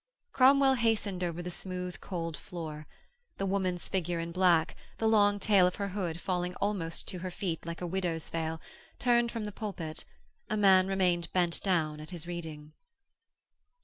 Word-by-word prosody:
Cromwell 270 +1 +6
hastened 220 -6 +1
over 175 0 -2
the 180 - -4
smooth, 180 0 -5
cold 165 -4 -4
floor. 155 -1 -7 0.5
The 195 - -1
woman's 185 -2 0
figure 175 -3 -1
in 165 0 -4
black, 175 -2 +3 0.2
the 225 - +1
long 205 -2 +4
tail 195 -3 +5
of 180 - -2
her 200 -1 -2
hood 180 -4 -3
falling 180 -1 -2
almost 185 -5 -2
to 180 - -4
her 185 +1 -4
feet 175 -3 -4
like 170 +1 -5
a - - -2
widow's 175 -3 -2
veil, 160 -1 -2 0.4
turned 240 -1 +3
from 225 -3 -3
the 210 - -4
pulpit; 185 -7 -5 0.5
a 215 - 0
man 190 -2 +6
remained 180 -3 +1
bent 175 -2 +1
down 160 -6 +1
at 155 - -9
his 175 -3 -6
reading. 160 -3 -7
180 Hz, 170 wpm, -31 LUFS, 165-200 Hz, 0.5 s, Cromwell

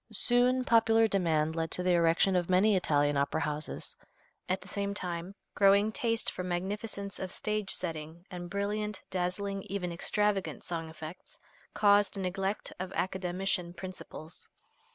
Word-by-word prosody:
Soon 250 +1 +4
popular 225 -1 +5
demand 160 -6 +1
led 165 -1 -1
to 180 - 0
the 180 - +3
erection 170 +2 +4
of 175 -1 +1
many 195 +3 +5
Italian 145 -5 +2
opera 140 +3 +1
houses. 150 0 -3 0.5
At 185 +1 +1
the - - -13
same 200 0 -2
time 175 0 -4 0.2
growing 200 +2 +5
taste 230 +1 0
for - - -5
magnificence 200 +3 -3
of 185 -1 -4
stage 210 -1 -2
setting 165 0 -4
and 175 -1 -6
brilliant, 210 +1 -2
dazzling, 190 +2 -1
even 180 -2 -2
extravagant 200 +3 0
song 165 -2 -4
effects, 160 +2 -10 0.4
caused 205 -1 +4
neglect 195 +2 -2
of 185 0 -4
Academician 180 -1 -1
principles. 185 -4 -9
185 Hz, 140 wpm, -31 LUFS, 170-200 Hz, 0.5 s, popular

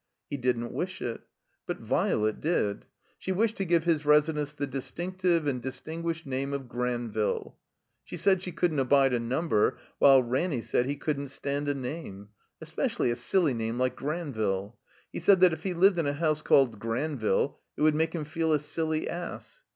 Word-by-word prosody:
He 145 - -1
didn't 120 -2 -1
wish 180 +1 -3
it. 115 -2 -4 0.5
But - - -2
Violet 110 0 0
did. 125 -11 0 0.3
She 190 - -3
wished 220 +4 +1
to 195 - -1
give 170 -2 +2
his 165 -3 +1
residence 150 0 +2
the 145 - -2
distinctive 170 +5 -1
and 130 -4 -1
distinguished 160 +6 -4
name 135 +1 -2
of 135 -2 -4
Granville. 120 -3 -2 0.4
She 180 - -8
said 190 +2 +3
she 185 - -4
couldn't 160 -2 0
abide 135 0 +4
a 120 - +2
number, 115 -1 +1 0.2
while 135 -2 +7
Ranny 130 +1 -1
said 125 - 0
he 140 - -1
couldn't 140 -1 -2
stand 140 +2 -3
a 145 - 0
name. 125 -7 -6 0.3
Especially 120 - -1
a - - -1
silly 165 +1 +2
name 115 0 -2
like 130 0 0
Granville. 120 - -2 0.4
He - - -3
said 185 +3 +5
that 180 -3 +7
if 160 - -5
he 185 0 -3
lived 185 +1 +5
in 160 - +1
a 145 - 0
house 155 0 +1
called 120 -6 +3
Granville 120 +1 -1 0.2
it - - 0
would 155 0 +5
make 160 +2 0
him 155 -3 -3
feel 160 +1 0
a 150 - +3
silly 155 +1 -1
ass. 175 - -6
145 Hz, 180 wpm, -28 LUFS, 125-165 Hz, 0.5 s, while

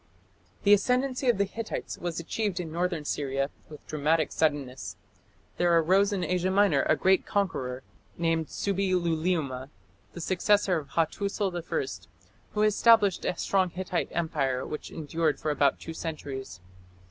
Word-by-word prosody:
The 205 - +6
ascendancy 255 +5 +2
of 240 - +3
the 200 - +3
Hittites 225 +3 -5
was 175 -1 -3
achieved 195 +2 -2
in 165 -3 -4
northern 170 -2 -1
Syria 135 -1 -1 0.2
with 150 -1 -12
dramatic 155 +1 +1
suddenness. 145 -5 -1 0.6
There 175 -1 +4
arose 190 +5 +4
in 195 -3 -1
Asia 180 +2 0
Minor 190 -7 +4
a 155 - +6
great 190 +3 +3
conqueror, 130 -11 -2 0.3
named 165 -2 0
Subbi 195 -1 -1
luliuma, 160 -6 -1 0.4
the - - -8
successor 190 0 +2
of 145 - -10
Hattusil 195 +3 0
I, 175 -1 -5 0.3
who 210 - +2
established 215 -2 +4
a 180 - -1
strong 190 0 +1
Hittite 180 0 -2
empire 140 -6 -1
which 150 - -6
endured 160 0 -1
for 155 - -1
about 140 -2 +2
two 165 - -7
centuries. 135 - -6
170 Hz, 145 wpm, -28 LUFS, 150-195 Hz, 0.6 s, The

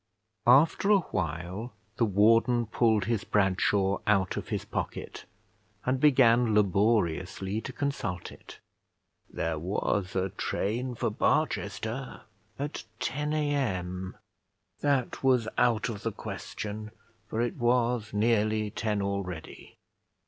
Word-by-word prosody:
After 145 +10 +5
a 205 -2 +6
while 90 +7 -3 0.2
the 115 - +3
warden 115 +4 +4
pulled 110 -2 +2
his 115 -1 0
Bradshaw 95 0 +2
out 100 -3 +2
of - - -5
his - - -3
pocket, - - -5 0.6
and 130 +1 +1
began 125 -5 +5
laboriously 100 -1 +1
to 135 - -6
consult 135 - -3
it. - - -13 0.7
There 80 -2 -2
was 95 +2 -1
a 95 0 0
train 120 +6 -2
for 115 -1 -1
Barchester 115 +4 -1 0.4
at 145 +2 -4 0.2
10 150 +3 -2
A.M. 95 -12 -1 0.6
That 140 -4 0
was 125 -4 +3
out 115 -3 +2
of 105 -3 -5
the 115 - -2
question, 105 +1 -6 0.4
for 110 - -3
it 120 0 -1
was 120 -2 +1
nearly 110 0 +1
ten 105 -2 -1
already. 95 -4 -5
110 Hz, 115 wpm, -29 LUFS, 100-125 Hz, 0.7 s, a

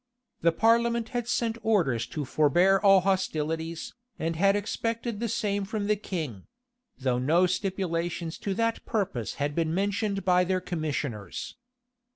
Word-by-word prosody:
The 170 - +4
parliament 230 +4 +2
had 245 -2 -3
sent 230 -1 0
orders 135 - +1
to 150 +3 -4
forbear 175 +8 +4
all 195 -2 +6
hostilities, 165 -3 -1 0.2
and 165 +1 -2
had 195 +4 +4
expected 230 +2 -2
the 235 0 -1
same 205 -3 0
from 205 +1 -3
the 210 +1 +2
king; 155 - -5 0.5
though 130 -2 0
no 160 +8 +3
stipulations 175 -3 -2
to 195 -2 -2
that 230 +1 0
purpose 185 - -2
had 145 +1 -1
been 165 +1 0
mentioned 200 0 -1
by 180 -1 +4
their 185 +1 0
commissioners. 145 - -4
185 Hz, 145 wpm, -28 LUFS, 160-210 Hz, 0.5 s, all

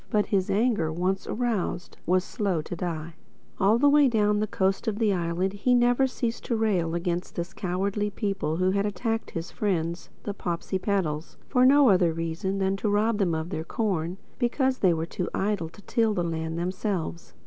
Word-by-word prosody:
But 210 -1 +2
his 190 -3 0
anger, 210 -7 +2
once 185 +4 -1
aroused, 220 -7 -2
was 185 +1 +3
slow 190 -7 -1
to 175 - -5
die. 165 -2 -4 0.5
All 205 +4 +4
the 285 +4 +4
way 290 0 +6
down 210 -3 +2
the 215 - 0
coast 190 +3 0
of 210 -2 0
the 215 -3 +2
island 175 +2 -1
he 245 +5 +2
never 245 +2 +4
ceased 240 -2 -3
to 235 - 0
rail 185 -7 +1
against 175 +1 -2
this 170 +2 -4
cowardly 200 +3 -1
people 195 -6 -2
who 185 +1 +2
had 200 +1 +1
attacked 225 +3 -2
his 165 +2 -5
friends, 170 -4 -2
the 205 - -3
Popsipetels, 175 -3 -2
for 255 -1 +4
no 280 -1 +6
other 180 -4 +4
reason 165 +4 -2
but 195 0 +1
to 210 - -1
rob 210 +2 +2
them 175 -5 +2
of 160 +3 -4
their 160 - -3
corn, 180 -3 -2 0.2
because 260 +1 +1
they 185 - +4
were 165 -1 0
too 175 +1 -4
idle 195 -5 -1
to 205 +5 -16
till 225 0 +1
the 175 - 0
land 160 -1 -3
themselves. 180 -1 -3
195 Hz, 190 wpm, -27 LUFS, 170-215 Hz, 0.5 s, way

